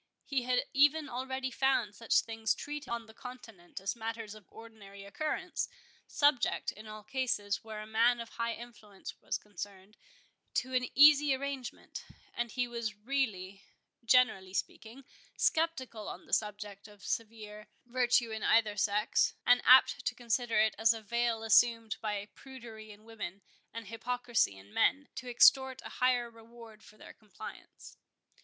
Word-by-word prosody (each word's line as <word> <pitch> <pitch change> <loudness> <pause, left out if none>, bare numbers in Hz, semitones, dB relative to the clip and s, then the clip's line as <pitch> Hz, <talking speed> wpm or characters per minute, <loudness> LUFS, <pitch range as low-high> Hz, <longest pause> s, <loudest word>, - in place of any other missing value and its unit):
He 275 -3 0
had 250 0 +1
even 295 +2 +4
already 260 +1 -4
found 250 -5 +1
such 225 +2 +2
things 225 -1 -1
treated 295 0 -7
on 235 -1 -3
the 220 - -15
continent 225 -7 -10
as 195 +3 -3
matters 225 -2 -5
of 215 -3 -15
ordinary 210 -3 -12
occurrence, 310 - -3 0.4
subject, 285 -4 +2
in 215 +1 -12
all 215 0 -9
cases 215 -4 -2
where 215 -1 -7
a - - -7
man 230 +3 +3
of 230 -1 -7
high 230 0 -3
influence 220 -4 -11
was - - -2
concerned, 200 0 -10 0.6
to 260 +1 -1
an 250 0 +1
easy 290 -1 +7
arrangement; 270 -2 -6 0.3
and 240 0 -2
he 250 -1 0
was 235 -3 -4
really, 205 -5 -2 0.4
generally 220 -6 +3
speaking, 235 +7 -5 0.3
sceptical 260 -9 0
on - - -8
the - - -12
subject 205 -1 -2
of 205 -2 -16
severe 215 -2 -5 0.2
virtue 245 -1 +2
in 220 -1 -4
either 220 -2 +3
sex, 210 +1 +1
and 245 0 +5
apt 260 +1 +6
to 250 - -1
consider 240 0 -1
it 220 0 +3
as 225 +1 +4
a 225 - -7
veil 235 +1 0
assumed 225 0 +4
by 205 -1 -3
prudery 230 -5 -11
in 210 0 -14
women, 200 -4 -7 0.3
and 230 0 -7
hypocrisy 235 - -1
in 100 +2 -16
men, 285 +1 +2
to 255 - -7
extort 265 +2 +5
a - - -6
higher 250 -1 +3
reward 230 -1 -15
for 215 - -17
their - - -12
compliance. 215 -2 -12
230 Hz, 155 wpm, -32 LUFS, 210-250 Hz, 0.6 s, easy